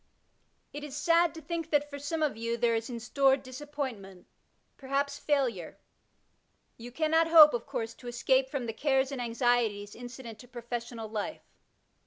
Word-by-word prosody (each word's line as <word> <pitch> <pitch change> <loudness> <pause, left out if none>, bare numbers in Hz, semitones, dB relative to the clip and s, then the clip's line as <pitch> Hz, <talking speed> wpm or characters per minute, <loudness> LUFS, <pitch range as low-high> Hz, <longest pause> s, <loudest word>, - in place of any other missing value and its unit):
It 290 - -6
is 290 -1 -6
sad 335 +2 +3
to 320 - -9
think 330 +1 -4
that, 295 -1 +2
for 285 -1 -8
some 310 +3 -2
of 295 -7 0
you, 230 +1 -2
there 235 0 +2
is 225 +1 -2
in 235 -2 -5
store 270 +3 +3
disappointment, 255 -8 -7 0.5
perhaps 280 +1 -2
&ilure. 245 - 0 1.1
Ton 240 +1 -8
cannot 320 +2 +2
hope, 315 -2 +9
of 240 +2 -3
course, 235 -5 -4
to 245 - -13
escape 260 +2 +1
from 265 -3 -3
the 225 - -4
cares 270 +1 +1
and 270 -3 -4
anxieties 230 -4 0
incident 245 -2 -9
to 245 - -13
professional 235 -1 -6
life. 215 +7 -5
260 Hz, 165 wpm, -30 LUFS, 235-290 Hz, 1.1 s, hope